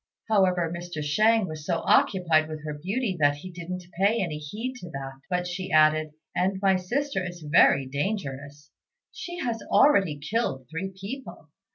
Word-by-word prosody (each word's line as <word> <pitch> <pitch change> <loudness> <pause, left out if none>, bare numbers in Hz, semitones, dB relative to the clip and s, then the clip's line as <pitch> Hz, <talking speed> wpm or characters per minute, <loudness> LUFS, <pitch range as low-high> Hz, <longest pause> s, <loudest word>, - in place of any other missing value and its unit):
However, 180 -5 +2
Mr. 175 -3 -5
Shang 215 +7 +3
was 155 -2 -7
so 165 +1 -1
occupied 165 -5 +3
with 155 -1 -7
her 150 - -3
beauty, 195 - -2
that 145 -1 +4
he 180 +6 -9
didn't 180 +1 -6 0.2
pay 215 +4 +4
any 165 -6 -2
heed 215 - -5
to 175 - -9
that; 135 -3 -7
but 180 -1 0
she 185 +1 -4
added, 155 -1 +4 0.2
"And 190 +2 +1
my 195 -1 +3
sister 240 +4 -1
is 175 -1 -7
very 145 -3 +5
dangerous; 145 -2 -4 0.4
she 350 -1 -7
has 240 -9 -2
already 195 - +4
killed 145 - -2
three 185 +4 -4
people. 260 +8 -8
180 Hz, 165 wpm, -26 LUFS, 150-200 Hz, 0.4 s, very